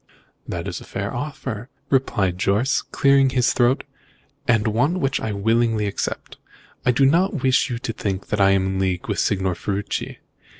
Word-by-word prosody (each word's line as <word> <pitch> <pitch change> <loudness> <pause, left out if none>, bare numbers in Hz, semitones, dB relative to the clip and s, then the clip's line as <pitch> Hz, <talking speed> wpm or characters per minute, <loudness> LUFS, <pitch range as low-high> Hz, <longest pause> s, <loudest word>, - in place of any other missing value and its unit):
"That - - -4
is - - -5
a - - -10
fair - - -4
offer," 130 -5 -5 0.2
replied 100 -9 +1
Jorce, 105 +8 +2
clearing 140 -1 +3
his 125 -1 +2
throat, 125 +1 +2 0.6
"and 115 -3 +3
one 125 - +1
which 135 -3 0
I 110 - -2
willingly 110 +1 +1
accept. 100 - -4 0.5
I - - +1
do 135 +3 +3
not 170 +1 +2
wish 130 +1 +3
you 120 - -2
to 115 -1 -4
think 100 -3 -4
that 105 - 0
I 95 - +6
am 95 -1 +3
in 95 0 -1
league 95 -2 -1
with - - -1
Signor 95 -2 +1
Ferruci. 100 +3 -3
115 Hz, 175 wpm, -22 LUFS, 100-135 Hz, 0.6 s, I